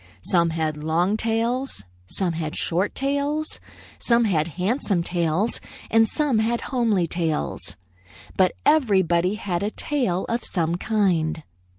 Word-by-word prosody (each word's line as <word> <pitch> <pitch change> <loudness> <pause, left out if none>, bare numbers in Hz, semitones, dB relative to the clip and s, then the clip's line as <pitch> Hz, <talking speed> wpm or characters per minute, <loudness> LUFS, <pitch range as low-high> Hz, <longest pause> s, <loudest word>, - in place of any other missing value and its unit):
Some 170 -2 +2
had 155 -2 -2
long 170 +6 +1
tails; 230 - -1 0.2
some 180 - -1
had 160 -2 -4
short 180 +4 0
tails; 285 +3 -1 0.4
some 235 0 +3
had 165 -7 +1
handsome 195 -2 0
tails 175 +5 0 0.3
and 225 0 +5
some 290 -7 +1
had 230 +2 0
homely 225 -8 +2
tails; 160 - -2 0.6
but 185 -1 +3
everybody 190 - +3
had 185 -4 -2
a 205 - 0
tail 220 -8 -1
of 235 +1 -1
some 165 -2 0
kind. 175 -5 0
190 Hz, 125 wpm, -24 LUFS, 170-235 Hz, 0.6 s, and